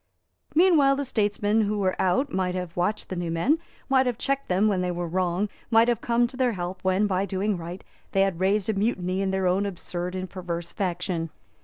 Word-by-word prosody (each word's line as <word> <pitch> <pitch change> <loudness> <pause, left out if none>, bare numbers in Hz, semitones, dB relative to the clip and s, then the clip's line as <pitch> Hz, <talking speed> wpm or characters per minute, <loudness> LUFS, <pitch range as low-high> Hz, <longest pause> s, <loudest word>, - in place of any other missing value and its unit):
Meanwhile 310 -6 +5
the 285 0 -2
statesmen 210 -2 +1
who 210 0 0
were 190 -2 +1
out 190 +10 +1
might 185 -1 0
have 180 -2 -4
watched 195 +5 -1
the 185 - -3
new 175 -1 -3
men, 200 - +2 0.3
might 265 -1 +3
have 245 -2 -1
checked 275 +2 -1
them 190 +4 +3
when 195 -3 +1
they 180 - -1
were 175 0 -2
wrong, 180 +3 0 0.2
might 230 0 +5
have 240 -2 +1
come 240 0 +2
to 250 +2 -6
their 250 -2 +1
help 180 0 -4
when, 190 +2 +2
by 190 -2 +1
doing 200 +1 -1
right, 175 +1 -7 0.3
they 195 - +2
had 195 -3 +1
raised 195 +1 +2
a 220 - +1
mutiny 195 -3 0
in 195 - 0
their 190 0 0
own 185 +2 +2
absurd 180 -2 -4
and 185 0 -3
perverse 175 -2 -5
faction. 175 -3 -2
190 Hz, 215 wpm, -26 LUFS, 180-220 Hz, 0.3 s, Meanwhile